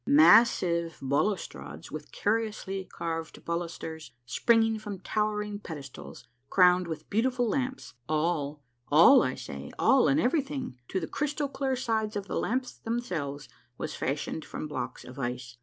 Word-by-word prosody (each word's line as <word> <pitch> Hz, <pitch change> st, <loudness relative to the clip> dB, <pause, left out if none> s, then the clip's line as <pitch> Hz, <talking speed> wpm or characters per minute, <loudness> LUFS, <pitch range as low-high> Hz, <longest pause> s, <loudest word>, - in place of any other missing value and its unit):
Massive 190 Hz, -, +5 dB
balustrades 140 Hz, -, -2 dB
with 155 Hz, -1 st, -7 dB
curiously 210 Hz, -3 st, -1 dB
carved 165 Hz, -2 st, -5 dB
balusters 165 Hz, -2 st, -4 dB, 0.2 s
springing 225 Hz, -, +3 dB
from 210 Hz, -2 st, -6 dB
towering 210 Hz, +1 st, -1 dB
pedestals, 145 Hz, -8 st, -9 dB, 0.2 s
crowned 180 Hz, -1 st, +5 dB
with 160 Hz, -2 st, -6 dB
beautiful 245 Hz, +3 st, +2 dB
lamps, 260 Hz, +3 st, -2 dB, 0.2 s
all, 150 Hz, -2 st, 0 dB, 0.2 s
all, 170 Hz, -, +8 dB
I -, -, 0 dB
say, -, -, -7 dB
all 265 Hz, -1 st, +5 dB
and 280 Hz, -, +3 dB
everything, 270 Hz, -, -1 dB
to 190 Hz, -, -1 dB
the 165 Hz, -, -3 dB
crystal 290 Hz, -, -2 dB
clear 270 Hz, -1 st, -1 dB
sides 220 Hz, -4 st, -1 dB
of 200 Hz, -1 st, -2 dB
the -, -, -2 dB
lamps 255 Hz, +2 st, -1 dB
themselves, 165 Hz, -, -3 dB, 0.3 s
was -, -, -4 dB
fashioned 150 Hz, +3 st, -2 dB
from -, -, -6 dB
blocks 125 Hz, -5 st, -5 dB
of 125 Hz, +2 st, -10 dB
ice. 120 Hz, -1 st, -4 dB
190 Hz, 140 wpm, -29 LUFS, 155-235 Hz, 0.3 s, all